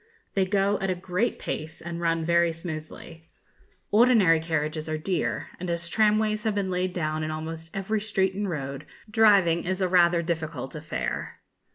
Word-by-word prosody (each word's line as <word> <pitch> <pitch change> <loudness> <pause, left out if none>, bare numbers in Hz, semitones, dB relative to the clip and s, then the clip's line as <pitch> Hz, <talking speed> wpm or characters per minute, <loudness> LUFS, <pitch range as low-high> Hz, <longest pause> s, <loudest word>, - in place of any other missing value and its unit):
They 190 -1 +1
go 200 +1 +2
at 195 - -1
a 185 - +1
great 180 +5 -1
pace, 160 +1 -5
and 170 0 -6
run 165 -1 +1
very 170 0 +3
smoothly. 165 0 -8 0.6
Ordinary 210 -7 +5
carriages 155 -1 -2
are 155 - -1
dear; 170 +2 -2
and 180 0 -4
as 170 0 -1
tramways 215 +1 +2
have 215 -2 +1
been 195 -2 -1
laid 180 0 0
down 155 -3 -2
in 155 - -2
almost 160 +1 -5
every 205 +2 -2
street 195 -3 +1
and 200 0 -2
road, 140 -3 -5 0.2
driving 200 -7 +5
is 185 +1 -2
a 185 - +2
rather 175 -1 +4
difficult 160 -6 -3
affair. 105 - -4
170 Hz, 170 wpm, -26 LUFS, 160-195 Hz, 0.6 s, Ordinary